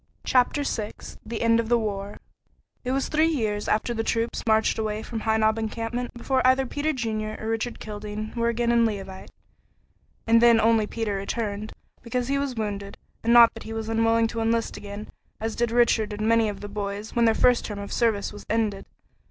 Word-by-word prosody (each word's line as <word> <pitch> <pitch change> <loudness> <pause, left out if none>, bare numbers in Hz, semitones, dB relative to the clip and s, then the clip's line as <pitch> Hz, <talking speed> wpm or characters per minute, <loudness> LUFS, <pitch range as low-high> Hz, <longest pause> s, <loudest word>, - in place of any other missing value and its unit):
CHAPTER 255 +3 +2
VI 215 -6 -3 0.3
THE 230 0 -4
END 230 0 +4
OF 230 -1 -2
THE 240 - +4
WAR 205 -2 -4 0.7
It 250 - -2
was 270 +1 0
three 315 +1 +3
years 215 -10 -1
after 220 +3 +1
the 225 -1 -2
troops 230 +1 -1
marched 220 0 +3
away 215 0 -2
from 230 - -5
High 220 0 +1
Knob 220 0 +2
encampment 230 +2 -3
before 260 +2 0
either 260 +1 +4
Peter 290 +4 -1
Junior 220 -5 -3
or 220 - -4
Richard 225 +2 -2
Kildene 210 +1 -6
were 235 0 +1
again 235 0 +1
in 235 0 +4
Leauvite, 195 -4 -4 1.0
and 230 0 +5
then 235 -1 +6
only 225 -1 +3
Peter 225 -2 -3
returned, 210 +1 -3 0.3
because 245 +1 -2
he 280 0 +1
was 275 -3 -2
wounded, 200 -2 -4 0.3
and 230 - +2
not 235 -1 +8
that - - -10
he 220 - -7
was 225 0 -4
unwilling 225 0 +3
to 230 - -4
enlist 230 0 0
again, 205 +1 -8 0.3
as 225 0 -3
did 240 0 0
Richard 225 -2 +2
and 215 +1 -2
many 230 -1 +3
of 205 - -7
the 205 - -5
boys, 205 +1 -5
when 235 -1 +4
their 225 -1 +4
first 250 -1 +4
term 210 - -5
of 200 0 -6
service 220 -4 +1
was 205 - -10
ended. 215 -3 -1
225 Hz, 200 wpm, -25 LUFS, 215-235 Hz, 1.0 s, not